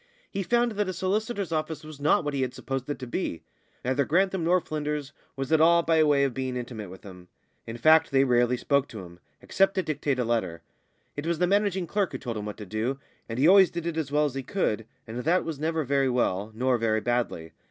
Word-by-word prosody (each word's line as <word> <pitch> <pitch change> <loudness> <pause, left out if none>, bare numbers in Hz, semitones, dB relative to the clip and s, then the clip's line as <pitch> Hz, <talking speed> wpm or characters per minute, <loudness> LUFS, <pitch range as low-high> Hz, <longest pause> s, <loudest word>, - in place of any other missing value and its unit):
He 200 - -2
found 240 +4 +2
that 210 -2 -1
a - - -2
solicitor's 200 +1 -2
office 155 0 -2
was 155 -2 -10
not 150 +3 +3
what 145 -1 -3
he 135 - -1
had 130 -1 -2
supposed 135 0 -4
it 145 - -2
to 130 - -7
be. 120 - -3 0.4
Neither 130 +2 +2
Grantham 185 +5 +1
nor 180 +2 +3
Flynders 150 -3 -4 0.2
was 135 +2 -4
at 160 -1 +4
all 170 +1 +5
by 165 -1 +3
way 145 -2 +3
of 135 -2 0
being 130 -1 -3
intimate 115 -5 -6
with 95 +1 -12
him; 90 -3 -12 0.4
in 115 +1 -6
fact, 155 +6 +5
they 135 -1 +4
rarely 125 -1 +2
spoke 140 +2 +1
to 110 - -8
him, 85 0 -14 0.2
except 195 0 +2
to 190 - +1
dictate 145 -3 -1
a 125 - 0
letter; 110 -8 -1 0.5
it 145 +3 -4
was 170 -1 0
the 180 - +2
managing 195 -1 +1
clerk 200 +2 -1
who - - -2
told 120 -3 -5
him 105 - -5
what 105 - -6
to 105 - -8
do, 110 +7 -2 0.3
and 115 - -4
he 140 +5 +4
always 190 0 +7
did 170 -2 -5
it 170 -1 -2
as 155 -4 -3
well 150 +1 +3
as 145 - -2
he 135 - -3
could, 115 - -2 0.2
and 115 +2 -6
that 170 +8 +1
was 160 -4 -5
never 160 +1 -1
very 135 0 +1
well, 110 -4 0
nor 125 +1 +1
very 110 -1 +1
badly. 120 -9 -2
140 Hz, 240 wpm, -27 LUFS, 120-170 Hz, 0.5 s, always